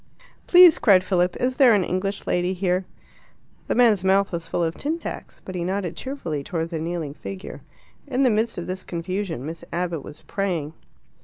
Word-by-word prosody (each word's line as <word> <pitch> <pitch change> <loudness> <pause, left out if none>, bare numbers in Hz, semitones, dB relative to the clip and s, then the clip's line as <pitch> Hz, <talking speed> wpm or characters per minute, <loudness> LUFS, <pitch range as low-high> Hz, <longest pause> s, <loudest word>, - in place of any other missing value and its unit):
"Please," 355 -2 +8
cried 190 -5 +5
Philip, 180 -1 +1
"is 255 +1 -1
there 255 -5 +7
an 195 - +2
English 195 +3 -2
lady 180 +1 0
here?" 185 0 0 0.8
The - - 0
man's 225 -6 +4
mouth 195 +1 +3
was 170 -2 -4
full 170 - -1
of 165 -1 0
tin 305 - -2
tacks, - - -8
but 185 - -7
he 175 -2 -3
nodded 185 -2 -2
cheerfully 170 - -4
towards 165 +2 -3
a 160 - -2
kneeling 165 -3 -3
figure. 190 +5 -8 0.5
In 270 0 +1
the 255 - +4
midst 220 +2 0
of 175 - -4
this 185 +1 -5
confusion 175 -4 -4
Miss 165 +2 -7
Abbott 170 -3 -2
was 150 - -11
praying. 175 -7 -2
185 Hz, 185 wpm, -23 LUFS, 170-205 Hz, 0.8 s, Please